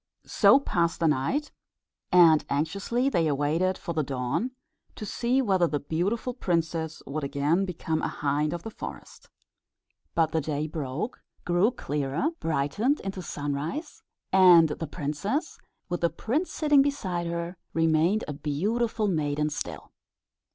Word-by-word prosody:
So 275 - +5
passed 170 -11 0
the 165 - +3
night; 150 - 0 0.6
and 165 -4 +7
anxiously 200 - 0
they 170 -12 +2
awaited 155 +6 +1
for 170 - -5
the 160 - +1
dawn, 135 - -2 0.5
to 215 - -6
see 250 +5 +1
whether 190 -6 +3
the 150 -2 -1
beautiful 190 - -1
princess 165 -7 -2
would 150 +2 -4
again 145 +7 +1
become 160 -3 -2
a - - 0
hind 145 +1 -1
of 170 0 -5
the 225 - -6
forest. - - -9 0.9
But 165 -2 +2
the 160 - +1
day 150 0 -2
broke, 155 - -4 0.2
grew 175 +5 +3
clearer, 150 - -2
brightened 165 - 0
into 195 -1 -5
sunrise, 145 - -4 0.3
and 180 -4 +7
the 160 +2 -4
princess, 195 - -3 0.3
with 175 - -3
the 170 - +3
prince 290 - -2
sitting 295 -3 +4
beside 190 -12 -1
her, 170 +1 -4 0.2
remained 165 +5 +2
a 150 - -3
beautiful 210 +10 -1
maiden 150 -4 0
still. - - -6
170 Hz, 140 wpm, -27 LUFS, 150-205 Hz, 0.9 s, and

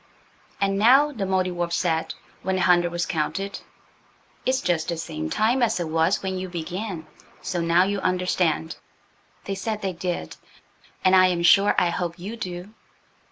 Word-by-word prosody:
"And 195 0 +1
now," 270 +7 +6
the 220 -8 -3
Mouldiwarp 180 -2 0
said, 165 -2 0 0.3
when 190 +1 -1
the 185 - +1
hundred 175 -1 +4
was 175 0 -1
counted, 190 +4 -2 0.9
"it's 260 0 +2
just 165 -2 0
the 170 - -2
same 80 - -4
time 235 - +1
as 235 -6 +2
it 170 -2 -3
was 165 +5 +1
when 190 -1 -2
you 185 0 -5
began! 175 +1 -5 0.4
So 180 -2 -2
now 170 +2 +4
you 200 +1 -1
understand." 180 -3 0 0.7
They 195 - -4
said 210 +2 -4
they 190 -1 -1
did, 175 - -4 0.7
and 185 0 +6
I 185 0 +7
am 175 -2 0
sure 200 +3 +5
I 175 - +3
hope 170 0 -3
you 195 +6 -6
do. 185 -1 -7
185 Hz, 165 wpm, -24 LUFS, 170-195 Hz, 0.9 s, I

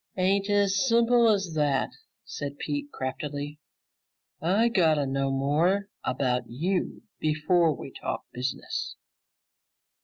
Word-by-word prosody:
"Ain't 195 +2 +2
as 200 0 +3
simple 235 0 +5
as 195 -5 +1
that," 145 -3 +1 0.3
said 145 -5 -6
Pete 290 - -3
craftily. 145 +2 -4 0.8
"I 195 +8 +3
gotta 160 -10 +3
know 135 0 0
more 160 +9 +1
about 125 -1 0
you 175 +10 -2 0.2
before 155 +1 +2
we 135 - -8
talk - - -5
business." 140 - -3
160 Hz, 110 wpm, -27 LUFS, 140-200 Hz, 0.8 s, simple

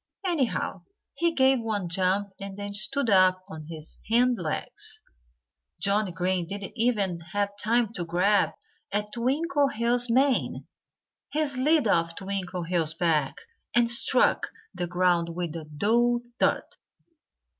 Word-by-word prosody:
Anyhow, 315 -10 -1 0.3
he 340 0 +1
gave 265 -1 +4
one 215 -5 -2
jump 190 +3 0
and 195 0 -7
then 205 0 -5
stood 240 +6 0
up 185 -2 +4
on 155 -1 -9
his 160 -1 -10
hind 245 +1 +3
legs. 155 -3 -5 0.8
Johnnie 200 -1 +1
Green 180 0 -1
didn't 200 +2 -6
even 210 -7 0
have 200 +5 -2
time 230 0 +1
to 180 - -3
grab 185 +5 +2 0.4
at 210 +1 -2
Twinkleheels' 245 -3 +1
mane. 265 +3 +1 0.7
He 305 +2 +1
slid 280 0 +2
off 165 -3 +1
Twinkleheels' 180 -4 -2
back 155 -6 +1 0.4
and 240 -1 +5
struck 240 +2 +3 0.3
the 175 - -3
ground 175 -1 +1
with 170 -2 -3
a 160 -2 -6
dull 235 +10 +1 0.2
thud. - - +2
200 Hz, 125 wpm, -27 LUFS, 175-240 Hz, 0.8 s, and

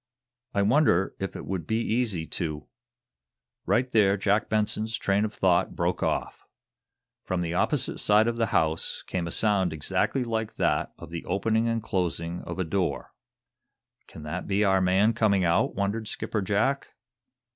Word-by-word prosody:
I 100 - +3
wonder 105 - +3
if 95 - -4
it - - -7
would 90 -5 -4
be 110 - 0
easy 110 -7 0
to 75 -3 -3 0.5
" - - -63
Right 125 +1 +2
there 100 -3 +4
Jack 105 +3 +1
Benson's 110 +1 -1
train 100 +1 +1
of 105 - -4
thought 95 -3 +1
broke 85 0 -1
off. - - -2 0.8
From 90 -1 -2
the 85 -1 -2
opposite 125 - 0
side 105 +2 +4
of 120 0 -1
the 115 -1 +1
house 80 -3 0
came 90 -2 -3
a - - -5
sound 100 -4 +2
exactly 100 - 0
like 110 -2 -3
that - - 0
of - - -11
the 85 - -5
opening 110 +5 +1
and 115 -1 -1
closing 85 -3 -2
of 85 - -6
a 95 - 0
door. 90 +1 -2 0.9
"Can 75 - -11
that 80 +4 -5
be 100 +1 +2
our 95 -2 +3
man 95 +5 +3
coming 100 -5 +2
out?" 85 0 +2
wondered 105 +3 -2
Skipper 105 0 -3
Jack. 110 +9 0
100 Hz, 165 wpm, -27 LUFS, 90-110 Hz, 0.9 s, there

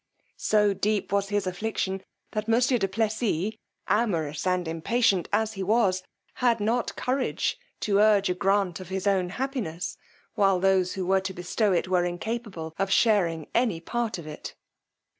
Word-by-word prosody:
So 210 -1 +3
deep 210 +1 -1
was 200 0 +1
his 205 -1 0
affliction, 190 0 -2 0.3
that 215 0 -3
monsieur 245 +2 +3
du 195 - +1
Plessis, 215 -1 0 0.3
amorous 170 -8 0
and 180 -2 +1
impatient 185 +4 +1
as 220 +1 +1
he 195 - -6
was, 195 -2 +2 0.4
had 235 -2 +3
not 230 +3 0
courage 260 - -1 0.2
to 200 -2 +2
urge 210 -2 +5
a 180 - +1
grant 195 -1 +1
of 185 -1 -9
his 190 0 -3
own 190 -3 +2
happiness, 220 - -3 0.4
while 195 -2 +3
those 190 -1 +2
who 190 -2 -2
were 190 +1 +3
to 190 0 -5
bestow 195 +4 0
it, 180 0 +1
were 180 -1 +2
incapable 175 -2 -4
of 195 0 +1
sharing 175 -9 +3
any 230 -8 +1
part 225 +3 -2
of 170 - -9
it. 150 -1 -8
195 Hz, 160 wpm, -26 LUFS, 180-220 Hz, 0.4 s, urge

